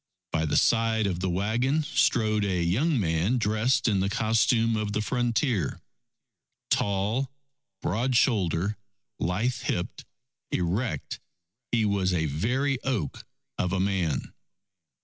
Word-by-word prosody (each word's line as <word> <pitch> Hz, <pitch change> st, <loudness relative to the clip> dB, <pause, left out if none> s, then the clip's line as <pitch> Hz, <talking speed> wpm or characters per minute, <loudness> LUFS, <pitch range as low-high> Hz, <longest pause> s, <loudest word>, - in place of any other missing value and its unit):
By 80 Hz, -1 st, 0 dB
the -, -, +1 dB
side 115 Hz, -2 st, +3 dB
of 90 Hz, -3 st, -1 dB
the 95 Hz, +1 st, -1 dB
wagon, 115 Hz, -, +1 dB
strode 110 Hz, -6 st, +2 dB
a 90 Hz, -3 st, 0 dB
young 130 Hz, -, +2 dB
man 85 Hz, +6 st, +1 dB
dressed 110 Hz, +3 st, +1 dB
in 100 Hz, -4 st, +2 dB
the 95 Hz, +1 st, +1 dB
costume 115 Hz, +2 st, +2 dB
of 105 Hz, -1 st, -2 dB
the 105 Hz, -, 0 dB
frontier. 120 Hz, -, 0 dB, 0.9 s
Tall, 105 Hz, +7 st, 0 dB, 0.5 s
broad 120 Hz, +8 st, 0 dB
shouldered, 100 Hz, -, +2 dB, 0.4 s
lithe 105 Hz, +9 st, 0 dB
hipped, 85 Hz, -, -3 dB, 0.5 s
erect, 95 Hz, +8 st, -2 dB, 0.5 s
he 115 Hz, -2 st, +2 dB
was 95 Hz, -2 st, +1 dB
a 80 Hz, -2 st, +1 dB
very 125 Hz, -, 0 dB
oak 115 Hz, -, -3 dB, 0.3 s
of 90 Hz, -, 0 dB
a 95 Hz, -, 0 dB
man. 95 Hz, -7 st, -1 dB
105 Hz, 125 wpm, -27 LUFS, 90-120 Hz, 0.9 s, side